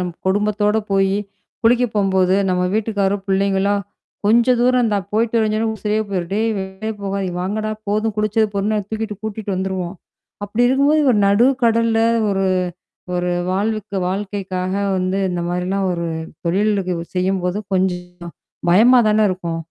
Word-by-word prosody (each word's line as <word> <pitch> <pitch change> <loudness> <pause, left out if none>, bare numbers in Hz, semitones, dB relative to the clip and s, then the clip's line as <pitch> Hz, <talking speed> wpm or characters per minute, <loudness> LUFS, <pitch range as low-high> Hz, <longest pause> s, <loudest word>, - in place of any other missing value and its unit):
நம்ம 180 -1 -3
குடும்பத்தோட 210 +2 +1
போயி 195 0 +2 0.5
குளிக்க 240 +2 +4
போம்போது 190 -2 +2
நம்ம 180 0 +1
வீட்டுக்காரோ 205 -2 0
பிள்ளைங்களா, 195 +1 +1 0.5
கொஞ்ச 235 +4 +4
தூரம்ந்தான் 240 -6 +2
போய்ட்டு 225 +2 +1
வரஞ்சோன்னாலே, 220 0 0
உசிரே 210 0 -1
போயிரு 180 -3 -2
டே 205 - +1 0.2
வெளே 190 +3 -5
போகாத, 200 0 -2 0.2
வாங்கடா 215 +4 -2 0.2
போதும் 215 +1 0
குளிச்சது 215 +1 +2
பொதுன்னு 210 +2 0
தூக்கிட்டு 220 -2 -4
கூட்டிட்டு 215 -1 -5
வந்துருவோம். 185 -1 -3 0.5
அப்படி 220 +4 0
இருக்கும்போது 285 +4 +3
ஒரு 210 - +2
நடு 205 +5 +4 0.2
கடல்ல 230 0 +3 0.3
ஒரு 195 0 0 0.7
ஒரு 180 0 0 0.2
வாழ்வுக்கு 210 +1 -2
வாழ்க்கைக்காக 190 -1 -3 0.2
வந்து 185 +1 -1
இந்த 175 - -2
மாரிலாம் 185 +2 -1
ஒரு 170 -1 -3 0.4
தொழிலிக்கு 195 0 +1 0.2
செய்யும்போது 185 0 0 0.2
கொஞ்சம் 180 -1 0 0.7
பயமா 240 +7 +6
தானே 215 0 +3
இருக்கும். 170 -3 -4
200 Hz, 130 wpm, -19 LUFS, 190-220 Hz, 0.7 s, பயமா